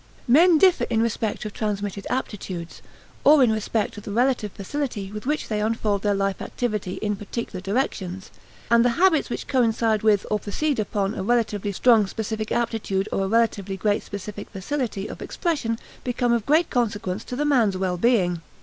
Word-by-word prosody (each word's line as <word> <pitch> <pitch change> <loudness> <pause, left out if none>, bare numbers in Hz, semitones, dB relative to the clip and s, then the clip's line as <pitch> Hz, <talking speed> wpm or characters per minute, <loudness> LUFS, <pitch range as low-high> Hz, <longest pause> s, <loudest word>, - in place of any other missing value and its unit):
Men 325 +7 +6
differ 365 +2 +4
in 230 -2 0
respect 220 -2 -2
of 210 - -5
transmitted 205 -2 -3
aptitudes, 190 -9 -4 0.4
or 290 -1 +7
in 235 - +4
respect 215 0 -1
of 205 - -8
the 205 - -6
relative 240 -2 +1
facility 205 -2 -4
with 210 +4 -7
which 300 +1 -1
they 210 -1 -1
unfold 215 -2 0
their 205 -1 +1
life 195 -1 -1
activity 210 -6 -3
in 210 -1 0
particular 205 -1 -5
directions; 190 -3 -2 0.4
and 235 0 +6
the 245 - +4
habits 345 -4 +3
which - - -4
coincide 225 -4 +2
with 210 -2 +3
or 210 - +2
proceed 275 +7 -1
upon 205 -1 -1
a - - -4
relatively 210 -2 0
strong 220 0 +4
specific 220 +1 -4
aptitude 220 -4 -1
or 195 - 0
a - - -1
relatively 205 -3 +1
great 205 +1 +1
specific 205 +1 -7
facility 205 0 -3
of - - -9
expression 290 -10 -1 0.3
become 245 -1 +1
of 235 -3 -1
great 315 +4 +3
consequence 210 -5 -1
to 250 - -6
the 295 +3 0
man's 235 -10 +3
well 185 -1 -1
being. 180 -6 +2
215 Hz, 175 wpm, -24 LUFS, 200-245 Hz, 0.4 s, or